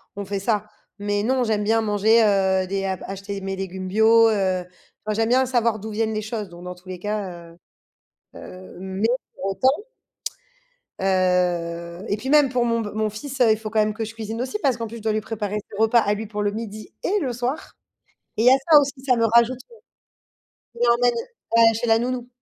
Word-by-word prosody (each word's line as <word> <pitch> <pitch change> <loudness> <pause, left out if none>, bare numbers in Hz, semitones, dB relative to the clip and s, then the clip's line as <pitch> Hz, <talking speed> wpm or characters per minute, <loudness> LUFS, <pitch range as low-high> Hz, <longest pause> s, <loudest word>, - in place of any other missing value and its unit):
on 200 0 -5
fait 200 +1 -3
ça. 210 +1 0 0.3
Mais 205 0 -1
non 255 +2 +1
j'aime 215 -3 0
bien 225 +2 +2
manger, 220 +2 +3
heu, 190 -2 +2
des 195 +1 -2
a 190 -1 -1
acheter 195 +1 -6
mes 195 0 -3
légumes 190 0 -5
bio, 225 +3 +5
heu, 190 -4 0
tu 180 - -24 0.3
vois 215 - -1
j'aime 225 +1 +1
bien 260 +2 +4
savoir 235 -3 +1
d'où 220 +2 -7
viennent 220 +1 -1
les 215 - -2
choses 215 -2 -5
donc 175 0 -12
dans 180 0 -6
tous 180 +1 -21
les 185 -1 -6
cas 185 -4 -4
heu 165 - -19 0.8
heu, 185 0 -11
mais 190 +3 -1 0.3
pour - - -7
autant 265 - +1 1.2
heu 180 -2 0
et 205 - 0
puis 245 +5 -5
même 295 -1 +5
pour 245 -1 +1
mon 230 -1 +1
b 210 - -4
mon 215 0 0
fils, 265 +6 -7
heu, 230 -3 +6
il 215 - +3
faut 215 0 -6
quand 220 0 0
même 215 0 +2
que 225 +1 -4
je 225 - -8
cuisine 225 +1 -5
aussi 260 +10 -3
parce 265 -7 +2
qu'en 230 -1 -4
plus 230 +2 -8
je - - -10
dois 220 +1 0
lui 215 - 0
préparer 210 -1 -3
ses 205 - -10
repas 225 +2 +5
à 205 -1 +1
lui 215 +1 -5
pour 210 0 -4
le 205 - +1
12:00 215 -1 -7
et 410 +3 +1
le 265 -5 -1
soir. 250 +5 -4 0.6
Et 220 - +2
il - - +2
y - - +9
a 260 - +6
ça 300 - +10
aussi, 280 -1 -1
ça 255 -2 +4
me 230 - +3
rajoute, 235 +2 +4
heu - - -14 1.0
je - - -11
l'emmène 240 +1 +4 0.4
ouais, 230 0 +6
chez 230 +2 -2
la 225 0 +4
nounou. 245 0 -3
215 Hz, 230 wpm, -23 LUFS, 195-230 Hz, 1.2 s, ça